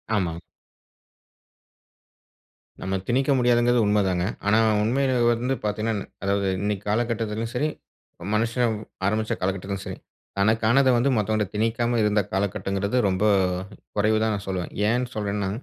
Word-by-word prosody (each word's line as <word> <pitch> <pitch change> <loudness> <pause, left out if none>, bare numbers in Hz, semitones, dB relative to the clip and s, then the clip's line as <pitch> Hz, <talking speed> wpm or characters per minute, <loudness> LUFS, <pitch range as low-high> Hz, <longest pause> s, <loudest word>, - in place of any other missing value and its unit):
ஆமாங். 85 -5 -1 2.4
நம்ம 95 +1 -2
திணிக்க 130 +3 +1
முடியாதுங்கிறது 120 0 +3
உண்மதாங்க. 95 -4 +1 0.2
ஆனா 110 - +4 0.3
உண்மைய 130 +4 +1 0.2
வந்து 125 +3 0
பாத்தீங்கன்னா 105 0 -1 0.2
அதாவது 100 0 +1
இன்னைக்கு 105 -1 -2
காலகட்டத்துலயும் 115 0 -1
சரி, 150 +4 +1 0.6
மனுஷன் 115 +1 +1 0.3
ஆரம்பிச்ச 110 +2 0
காலகட்டத்துலயும் 95 +1 -3
சரி. - - -6 0.4
தனக்கானத 115 +6 +3
வந்து 125 +4 +2
மத்தவன்ட்ட 110 0 +1
திணிக்காம 115 +2 0
இருந்த 105 0 +3
காலகட்டங்கிறது 100 +2 -1
ரொம்ப 95 +2 -1 0.7
குறைவுதான்னு 110 +1 +2
நான் 100 - -6
சொல்லுவேன். 90 -2 -3 0.2
ஏன் 125 +2 +1
சொல்றேன்னா, 100 -2 -2
110 Hz, 110 wpm, -24 LUFS, 100-120 Hz, 2.4 s, ஆனா